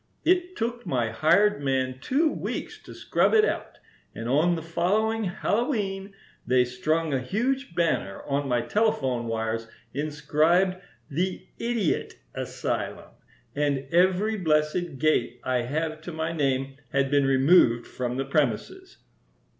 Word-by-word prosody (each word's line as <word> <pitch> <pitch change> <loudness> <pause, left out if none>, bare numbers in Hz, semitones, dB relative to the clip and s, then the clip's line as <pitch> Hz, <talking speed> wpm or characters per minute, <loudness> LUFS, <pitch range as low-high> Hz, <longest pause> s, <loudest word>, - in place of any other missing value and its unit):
It 360 0 +2
took 235 +1 -3
my 120 - -1
hired 200 +1 +3
man 130 -2 -1
two 300 - +2
weeks - - -5
to - - -10
scrub - - +2
it 430 0 +6
out. - - -3 0.4
And 115 - -5
on 155 +7 +3
the 160 - -5
following 210 +7 0
Hallowe'en 200 0 -1 0.3
they 125 0 +3
strung 155 +5 -1
a 135 - +2
huge 245 - -1
banner 160 - 0
on 140 0 -1
my 125 -2 +1
telephone 130 - 0
wires, 115 0 -2 0.3
inscribed 155 +5 +1 0.3
'The 180 +6 -2
Idiot 230 -7 -1 0.2
Asylum,' - - -4 0.4
and 140 -2 0
every 185 +5 +3
blessed 155 -2 0
gate 130 -5 +1
I 125 -1 +1
have 155 +3 -2
to 175 - -7
my 160 0 -2
name 135 -3 -1
had 135 0 +1
been 140 -1 +3
removed 135 -3 +4
from 125 0 -4
the 135 - -1
premises." 155 - -1
155 Hz, 135 wpm, -26 LUFS, 135-195 Hz, 0.4 s, it